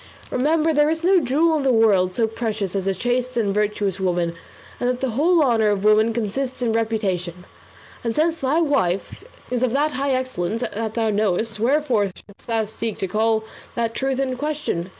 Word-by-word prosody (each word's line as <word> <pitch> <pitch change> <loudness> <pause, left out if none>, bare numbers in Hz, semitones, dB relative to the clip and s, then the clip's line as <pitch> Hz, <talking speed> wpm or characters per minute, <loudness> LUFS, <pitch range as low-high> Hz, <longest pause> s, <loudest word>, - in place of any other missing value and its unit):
Remember 310 +5 +2
there 295 0 +3
is 320 +1 -2
no 370 +1 +5
jewel 315 +4 +2
in - - -1
the 270 -1 +2
world 200 -6 +3
so 230 - +2
precious 220 -4 -3
as 195 -1 -1
a 195 - +2
chaste 245 +4 -1
and 205 -4 +1
virtuous 205 -2 -1
woman, 175 -2 0 0.5
and 245 - 0
that 250 0 -1
the 265 -2 -1
whole 320 +7 +3
honour 225 -5 +3
of 205 -1 0
women 215 +2 +4
consists 245 +4 -3
in 230 -2 +1
reputation; 190 -6 -2 0.6
and 230 -2 -2
since 325 +2 +1
thy 275 +5 +1
wife's 230 - 0 0.3
is 245 -1 0
of 255 -2 +1
that 295 +3 +2
high 280 0 -2
excellence 230 -4 -2
that 220 -1 -4
thou 225 -2 +1
knowest, 215 +1 0
wherefore 250 -3 +2
shouldst 195 +1 -12
thou 225 -1 +1
seek 220 0 -4
to 190 - -2
call 220 +3 +1 0.3
that 230 -1 -1
truth 270 +2 -1
in 260 -2 -1
question? 290 - -3
230 Hz, 190 wpm, -22 LUFS, 210-270 Hz, 0.6 s, no